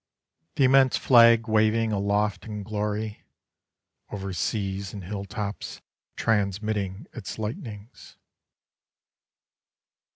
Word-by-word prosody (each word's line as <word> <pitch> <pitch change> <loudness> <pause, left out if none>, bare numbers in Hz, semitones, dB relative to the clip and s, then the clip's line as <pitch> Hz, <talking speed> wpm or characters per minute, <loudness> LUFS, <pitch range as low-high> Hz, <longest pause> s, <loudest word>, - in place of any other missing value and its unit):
The 140 - +2
immense 130 0 +5
flag 115 -2 +6
waving 110 +1 +2
Aloft 100 0 0
in 105 -2 -5
glory: 105 +1 -3 0.9
Over 100 -2 -5
seas 95 +2 -2
and 100 - -7
hilltops 100 +2 -5 0.4
Transmitting 100 -1 -1
its 110 -7 -7
lightnings. 110 0 -7
105 Hz, 85 wpm, -26 LUFS, 100-110 Hz, 0.9 s, flag